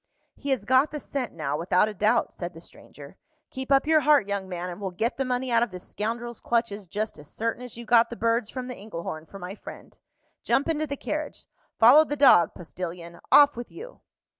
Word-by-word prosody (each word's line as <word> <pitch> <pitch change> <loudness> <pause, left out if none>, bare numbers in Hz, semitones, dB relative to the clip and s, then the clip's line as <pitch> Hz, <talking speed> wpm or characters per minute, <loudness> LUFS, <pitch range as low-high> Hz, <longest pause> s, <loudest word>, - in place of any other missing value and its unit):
"He 285 - -7
has 255 -7 0
got 260 +3 +4
the 300 - -5
scent 275 -4 -4
now, 150 -3 -3
without 180 +4 +2
a 215 - -5
doubt," 210 +2 +1
said 175 -1 -6
the - - -10
stranger. - - -13 0.3
"Keep 265 +1 -6
up 275 +1 +4
your 315 0 +4
heart, 295 -6 +4
young 200 -2 -3
man, 180 -1 -4
and 175 - -9
we'll 195 - -2
get 220 +7 -2
the 270 - -1
money 250 0 -2
out 230 0 +4
of 240 - +1
this 180 -2 -9
scoundrel's 235 +2 -4
clutches 220 -4 -1
just 210 -2 -4
as 145 -1 -13
certain 230 +2 -3
as 250 -2 -8
you 235 - -8
got 235 0 +4
the 235 - -6
birds 230 -1 0
from 255 -1 -5
the 255 - -5
Engelhorn 170 -7 -7
for 195 - -11
my 180 0 -7
friend. - - -12 0.5
Jump 275 - +1
into 310 -1 -1
the 280 0 -4
carriage. 305 +1 -5 0.3
Follow 250 +7 +8
the 290 -1 -3
dog, 255 - +5
postilion. 170 -1 -7
Off 290 0 +7
with 240 0 -8
you!" 470 +7 -11
230 Hz, 220 wpm, -26 LUFS, 185-265 Hz, 0.5 s, Follow